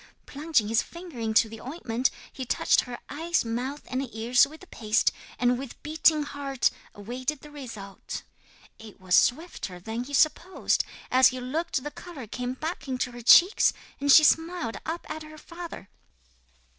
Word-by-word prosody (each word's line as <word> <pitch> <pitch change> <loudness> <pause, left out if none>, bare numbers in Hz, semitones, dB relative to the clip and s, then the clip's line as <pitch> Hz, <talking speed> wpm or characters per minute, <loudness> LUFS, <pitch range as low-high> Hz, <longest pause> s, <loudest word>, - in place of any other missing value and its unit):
Plunging 295 -6 0
his 225 +1 +3
finger 340 -6 -10
into 220 0 +3
the 220 0 -10
ointment 255 -3 -1 0.2
he 265 - -5
touched 245 - +3
her 245 -1 -7
eyes, 325 -1 -1
mouth 250 +6 -3
and 260 +1 -2
ears 235 +4 +4
with 310 +2 -13
the - - -12
paste, 220 -9 +1 0.3
and 245 0 +2
with 270 -2 -8
beating 310 0 +3
heart 280 -3 -1 0.2
awaited 250 +7 -4
the 300 - -13
result. 230 -9 -8 0.6
'It 220 -2 -13
was 185 -1 -3
swifter 245 - +2
than 225 +6 -4
he 285 +2 -4
supposed. 335 +6 +2 0.3
As 260 0 +7
he 255 - -2
looked 265 +2 -2
the 295 - -5
colour 320 -9 -9
came 250 +4 -4
back 310 -1 -5
into 255 -1 -2
her 240 0 -9
cheeks, 350 - +6 0.3
and 285 0 +3
she 310 - +9
smiled 325 -6 +2
up 330 +2 -4
at 310 0 -6
her 310 0 -11
father. 335 - -9
260 Hz, 165 wpm, -27 LUFS, 235-310 Hz, 0.6 s, she